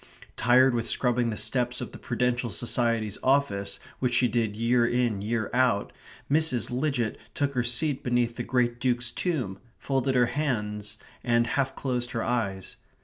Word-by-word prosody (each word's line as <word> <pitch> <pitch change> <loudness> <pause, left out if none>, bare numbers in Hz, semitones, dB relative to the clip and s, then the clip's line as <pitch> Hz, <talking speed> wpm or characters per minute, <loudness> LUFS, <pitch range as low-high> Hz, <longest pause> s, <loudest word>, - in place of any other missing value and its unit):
Tired 130 +1 +5
with 115 -1 -1
scrubbing 120 -2 +1
the 105 - -3
steps 125 +1 -1
of - - -6
the - - -11
Prudential 125 0 -1
Society's 115 -1 0
office, 100 -8 +1 0.2
which 125 -2 +1
she 125 - +4
did 115 -2 -1
year 120 +2 +2
in 120 -4 +1
year 110 +1 -1
out, 125 -5 +2 0.3
Mrs. 145 -5 +1
Lidgett 125 -3 -1 0.2
took 140 -1 0
her 125 -2 0
seat 130 +4 +1
beneath 120 -1 +1
the - - -4
great 120 -1 0
Duke's 120 -2 0
tomb, 125 - -2 0.2
folded 135 -1 -1
her 125 -1 +5
hands, 105 -6 -2 0.3
and 120 -1 +3
half 135 +2 -1
closed 125 -2 -2
her 115 - -1
eyes. 100 -6 -2
120 Hz, 160 wpm, -27 LUFS, 115-130 Hz, 0.3 s, Tired